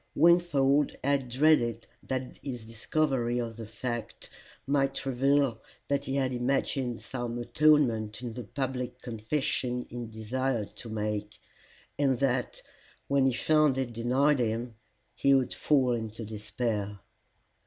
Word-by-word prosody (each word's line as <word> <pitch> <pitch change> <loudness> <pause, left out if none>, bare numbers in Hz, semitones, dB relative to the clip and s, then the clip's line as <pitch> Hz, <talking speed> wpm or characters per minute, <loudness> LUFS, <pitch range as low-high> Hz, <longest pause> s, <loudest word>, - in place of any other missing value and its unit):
Wingfold 150 -4 +4
had 140 -2 +1
dreaded 120 -4 +3 0.2
that 130 -1 -4
his 125 -5 -6
discovery 120 +1 0
of 115 -2 -3
the 115 -1 -8
fact 120 +1 -5 0.3
might 135 -1 0
reveal 135 -2 +2 0.3
that 140 0 0
he 135 - -2
had 130 -2 +1
imagined 125 -1 -1
some 120 -2 -4
atonement 120 -4 +3
in 120 -2 -4
the 125 - -6
public 125 +1 -4
confession 125 +1 -2
he 120 -1 -5
desired 115 +1 -2
to 115 - -7
make, 105 -1 -3 0.6
and 135 -3 +3
that, 125 -2 -1 0.5
when 140 -1 +4
he 130 - +2
found 155 +1 +3
it 130 -3 -2
denied 130 +5 +2
him, 115 0 -1 0.4
he 140 0 +4
would 130 -2 +1
fall 135 -4 +2
into 110 -1 -3
despair. 105 -1 -3
125 Hz, 130 wpm, -29 LUFS, 115-135 Hz, 0.6 s, Wingfold